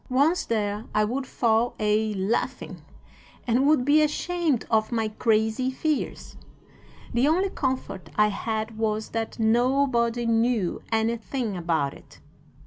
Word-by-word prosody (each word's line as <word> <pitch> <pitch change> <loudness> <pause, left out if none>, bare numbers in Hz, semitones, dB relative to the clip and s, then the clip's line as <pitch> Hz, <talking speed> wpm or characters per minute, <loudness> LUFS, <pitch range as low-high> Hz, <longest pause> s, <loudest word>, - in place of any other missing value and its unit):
"'Once 285 +7 +2
there 210 -1 -2
I 215 - +4
would 260 +4 -3
fall 230 -1 +1
a 215 0 +1
laughing, 195 +4 -2 0.6
and 250 +3 +2
would 295 -5 +3
be 295 +2 +5
ashamed 305 -2 0
of 220 0 +2
my 225 -2 0
crazy 220 +3 +1
fears. 300 +3 -3 0.8
The 240 +4 +3
only 370 +5 +2
comfort 260 - -3
I 210 0 +4
had 220 +2 -3
was 215 -1 -1
that 225 -1 -4
nobody 240 +1 +2
knew 230 -4 +1
anything 225 0 -1
about 165 -5 -1
it. 140 - -17
230 Hz, 130 wpm, -25 LUFS, 215-260 Hz, 0.8 s, be